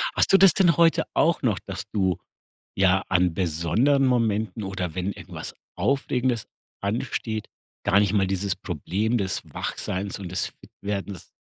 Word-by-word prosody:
Hast - - +3
du 195 - +9
das 195 -4 +8
denn 175 -5 +4
heute 165 -1 +4
auch 170 0 +2
noch, 110 -7 +1
dass 95 0 -6
du, 95 -4 +1 0.6
ja, 95 0 +3
an 90 -2 +3
besonderen 95 - +2
Momenten 110 -3 0
oder 95 -3 -4
wenn 95 +2 -1
irgendwas - - -8 0.2
Aufregendes 130 -4 0 0.3
ansteht, 110 +1 -2 0.4
gar 100 0 +5
nicht 105 -1 +2
mal 95 -2 +3
dieses 95 0 -1
Problem 95 +6 -1
des 95 -3 -1
Wachseins 95 +2 -3
und 95 -3 -6
des - - -1
Fitwerdens 100 -2 -7
100 Hz, 145 wpm, -25 LUFS, 95-120 Hz, 0.6 s, du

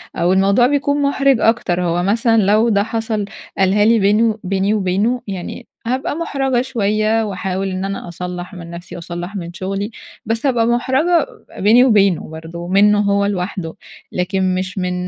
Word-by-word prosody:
أو 175 +2 +2
الموضوع 200 +6 +4
بيكون 285 +1 0
مُحرِج 275 -2 +2
أكتر، 195 -7 +1
هو 175 0 0
مثلًا 225 +4 +2
لو 210 +4 +3
ده 200 -2 +2
حصل 225 -1 -2 0.3
قالها 195 +2 +3
لي 230 0 +4
بينه 215 +2 +2
بيني 195 +2 0
وبينه، 210 +5 0
يعني 190 -3 -6 0.2
هابقى 260 +3 -1
مُحرَجة 270 -6 0
شوية 215 -2 0
واحاول 190 -1 -3
إن 185 +1 -3
أنا 195 -2 -5
أصلّح 180 +2 -6
من 170 -2 -9
نفسي 170 +1 -9
واصلّح 175 +3 -6
من 175 -3 -6
شغلي، 195 +4 -4 0.3
بس 225 +4 -2
هابقى 245 -4 +2
مُحرَجة 265 +8 +2 0.3
بيني 225 +5 +5
وبينه 200 -10 +3
برضه 165 +2 -8
منّه 205 +2 +4
هو 200 0 +2
لوحده، 185 -4 -3 0.4
لكن 185 0 0
مش 185 0 -4
من 180 -1 -1
200 Hz, 160 wpm, -18 LUFS, 185-230 Hz, 0.4 s, بيني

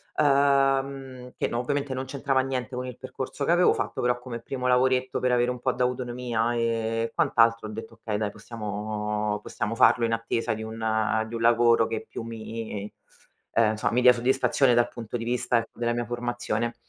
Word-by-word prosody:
uhm, 135 -2 +1
che - - 0
no 120 - -2
ovviamente 140 +2 -1
non 130 +1 -3
c'entrava 135 0 0
niente 130 -1 -3
con 125 0 -4
il 125 - -8
percorso 130 +2 -5
che - - +2
avevo 175 +1 +5
fatto, - - -3
però 125 0 +2
come 125 -1 -7
primo 125 +2 -5
lavoretto 130 0 +2
per 125 0 +1
avere 125 0 +2
un 125 - -6
po' 130 +1 +1
d'autonomia, 125 -2 -1
e - - 0 0.4
e 115 - -3
quant'altro 115 -1 +3
ho - - -8
detto: 115 +1 -9
"Okay, 105 -2 -2
dai 105 -1 -2
possiamo 105 -1 -3
possiamo 105 +2 -3
farlo 115 +1 +5
in 115 - 0
attesa 115 0 -1
di 110 - -6
un 110 0 0
di 115 - -7
un 115 - -4
lavoro 115 0 +5
che 110 0 -4
più - - -6
mi 110 -2 -6 0.6
ehm, 115 -1 +4
insomma 110 +1 -1
mi 125 - +3
dia 125 0 +8
soddisfazione 125 +1 +2
dal 120 0 +3
punto 120 0 -6
di 115 - -5
vista, 120 0 +1
ecco, 115 -1 -5
della 120 0 +1
mia 120 0 -2
formazione." 120 -1 -2
120 Hz, 195 wpm, -26 LUFS, 115-130 Hz, 0.6 s, dia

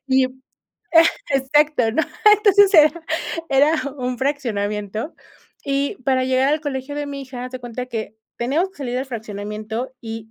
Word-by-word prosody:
Y 260 -1 +3 1.0
exacto, 270 -3 +2
¿no? 320 - +2 0.3
Entonces, 405 -1 +5
era 310 +1 +6 0.5
era 285 +4 +4 0.2
un 250 0 -2
fraccionamiento, 215 - -2 0.5
y 280 0 -1
para 260 -1 +2
llegar 260 +1 +2
al 305 - 0
colegio 275 -1 -4
de 290 0 -3
mi 280 -1 -6
hija, 255 -2 -7
haz 255 - -7
de 255 - -6
cuenta 245 +1 -6
que 220 -3 -5 0.2
teníamos 295 +11 0
que - - -26
salir 250 -4 -4
del 265 +2 -2
fraccionamiento, 215 +1 -5
y 225 -1 -7
260 Hz, 150 wpm, -21 LUFS, 230-285 Hz, 1.0 s, era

